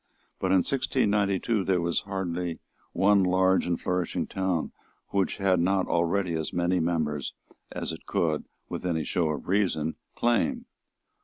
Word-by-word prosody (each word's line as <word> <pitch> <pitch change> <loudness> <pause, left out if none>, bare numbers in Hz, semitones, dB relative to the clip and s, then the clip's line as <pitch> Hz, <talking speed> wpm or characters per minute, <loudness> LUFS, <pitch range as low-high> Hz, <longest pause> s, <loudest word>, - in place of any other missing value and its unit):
But 95 - 0
in 95 -1 +4
1692 105 -5 +1
there 95 -1 +2
was 85 0 +1
hardly 90 -3 -3 0.3
one 100 0 +4
large 95 0 +3
and 85 -1 0
flourishing 90 -2 -1
town 95 -4 -1 0.4
which 100 -2 0
had 95 -3 +2
not 95 +2 +2
already 85 +2 +1
as 80 -1 -2
many 90 +1 +1
members 80 -4 -1 0.4
as - - -3
it - - -9
could, 80 -3 0 0.2
with - - -5
any 85 -3 0
show 85 +1 0
of 75 - -4
reason, 90 -5 +1 0.2
claim. 235 - +1
90 Hz, 145 wpm, -27 LUFS, 85-100 Hz, 0.4 s, in